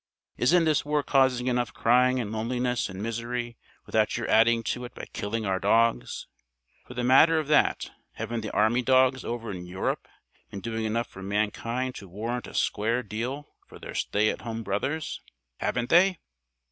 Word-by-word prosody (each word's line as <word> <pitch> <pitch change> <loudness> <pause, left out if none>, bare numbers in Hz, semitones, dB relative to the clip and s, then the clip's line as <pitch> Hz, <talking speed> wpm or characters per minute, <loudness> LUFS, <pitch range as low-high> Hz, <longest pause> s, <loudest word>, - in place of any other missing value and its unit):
Isn't 165 +7 +3
this 155 -2 +2
war 150 0 0
causing 130 -3 +2
enough 120 -4 -1
crying 125 +2 +3
and 110 -4 -3
loneliness 120 +2 -1
and 95 +2 -6
misery 120 +1 -3 0.3
without 110 0 +1
your 115 - -3
adding 115 +1 +4
to 125 +3 -3
it 120 - -11
by - - -7
killing 110 +2 -3
our 95 -1 0
dogs? 115 +4 +1 0.6
For 125 - -10
the 125 - -2
matter 145 +6 +6
of 155 -2 -1
that, 150 - +2 0.2
haven't 115 -1 -4
the 110 - -4
army 110 +4 +2
dogs 130 +1 +3
over 115 -2 -4
in 90 -2 -7
Europe 95 +2 -3 0.4
been 100 - -7
doing 115 +2 -3
enough 115 +2 0
for 95 - -12
mankind 110 +6 -2
to 100 - -10
warrant 115 +6 -4
a - - -11
square 115 +4 0
deal 125 +7 -5
for - - -13
their - - -9
stay 105 +1 +1
at - - -7
home 115 0 -5
brothers? 135 +11 -2 0.4
Haven't 125 -1 -1
they?" 185 +2 +5
120 Hz, 175 wpm, -27 LUFS, 110-125 Hz, 0.6 s, matter